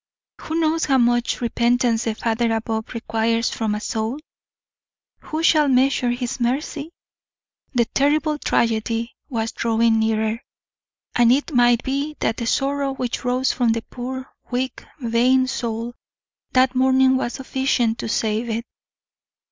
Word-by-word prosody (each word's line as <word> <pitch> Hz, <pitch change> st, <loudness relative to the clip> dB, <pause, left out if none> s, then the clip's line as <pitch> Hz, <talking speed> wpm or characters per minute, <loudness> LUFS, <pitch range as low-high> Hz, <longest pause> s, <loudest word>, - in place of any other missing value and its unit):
Who 315 Hz, -, -4 dB
knows 320 Hz, 0 st, +1 dB
how 270 Hz, -2 st, +3 dB
much 240 Hz, 0 st, +1 dB
repentance 235 Hz, 0 st, +1 dB
the 225 Hz, -2 st, -1 dB
Father 230 Hz, +1 st, 0 dB
above 220 Hz, 0 st, -3 dB
requires 230 Hz, +1 st, 0 dB
from 220 Hz, -2 st, -1 dB
a -, -, -3 dB
soul? 220 Hz, +4 st, -2 dB, 1.1 s
Who 315 Hz, +1 st, -3 dB
shall 305 Hz, -3 st, +4 dB
measure 260 Hz, -1 st, +3 dB
His 245 Hz, +1 st, -3 dB
mercy? 280 Hz, +5 st, -2 dB, 0.9 s
The 235 Hz, -1 st, +3 dB
terrible 300 Hz, +4 st, +1 dB
tragedy 230 Hz, 0 st, 0 dB, 0.2 s
was 225 Hz, -4 st, -2 dB
drawing 230 Hz, 0 st, +2 dB
nearer; 220 Hz, +1 st, 0 dB, 0.7 s
and 240 Hz, -1 st, +5 dB
it 290 Hz, +4 st, +1 dB
might 240 Hz, -1 st, +4 dB
be 280 Hz, +3 st, -2 dB
that 225 Hz, -, 0 dB
the 235 Hz, -, -3 dB
sorrow 275 Hz, +1 st, 0 dB
which 250 Hz, -2 st, -3 dB
rose 250 Hz, +1 st, +1 dB
from 240 Hz, -3 st, +1 dB
the 230 Hz, 0 st, -3 dB
poor, 260 Hz, +1 st, -5 dB, 0.2 s
weak, 255 Hz, +1 st, -3 dB, 0.2 s
vain 250 Hz, +2 st, +3 dB
soul 235 Hz, -2 st, -3 dB, 0.6 s
that 255 Hz, 0 st, +4 dB
morning 260 Hz, 0 st, +4 dB
was 240 Hz, -2 st, -1 dB
sufficient 260 Hz, -3 st, 0 dB
to -, -, -4 dB
save 220 Hz, +1 st, 0 dB
it. 230 Hz, +1 st, -2 dB
245 Hz, 140 wpm, -22 LUFS, 230-265 Hz, 1.1 s, and